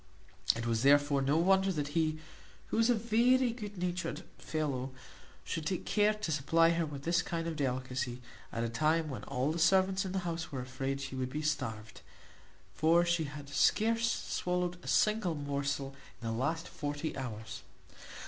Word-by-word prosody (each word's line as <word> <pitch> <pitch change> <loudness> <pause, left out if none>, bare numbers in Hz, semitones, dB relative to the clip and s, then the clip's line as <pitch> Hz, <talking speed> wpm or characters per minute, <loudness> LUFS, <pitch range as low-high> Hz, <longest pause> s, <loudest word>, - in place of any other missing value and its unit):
It 115 0 -4
was 115 -1 +1
therefore 145 +1 +4
no 140 +3 +2
wonder 190 +3 +4
that 145 -5 -2
he, 155 0 +1 0.5
who - - -1
was 230 +1 +4
a 245 - +5
very 235 +3 +3
good 210 -4 -7
natured 180 0 -3 0.2
fellow, 140 -5 -2 0.5
should 160 -2 -3
take 185 -2 -2
care 210 0 +3
to 210 -6 -3
supply 165 +3 +3
her 165 -1 0
with 140 -2 -7
this 170 +2 +2
kind 165 -2 -3
of 165 -1 -3
delicacy, 130 -3 -2 0.3
at 115 - -2
a 115 - -1
time 155 +5 +1
when 115 -6 -6
all 130 +4 0
the 165 - -3
servants 190 +2 +4
in 190 - -4
the 190 - -2
house 165 -1 -3
were 135 - -4
afraid 135 +2 -3
she 135 -1 -5
would 130 -1 -2
be 150 +4 -4
starved; 110 -8 -3 0.7
for 170 +2 +4
she 170 -2 +1
had 145 0 -8
scarce 230 +10 +3
swallowed 180 0 -2
a - - -10
single 185 +5 +2
morsel 140 -1 -2 0.2
in 115 - -5
the 115 - -1
last 155 +8 -1
forty 145 +2 -4
hours. 110 -5 -6
155 Hz, 175 wpm, -32 LUFS, 135-180 Hz, 0.7 s, a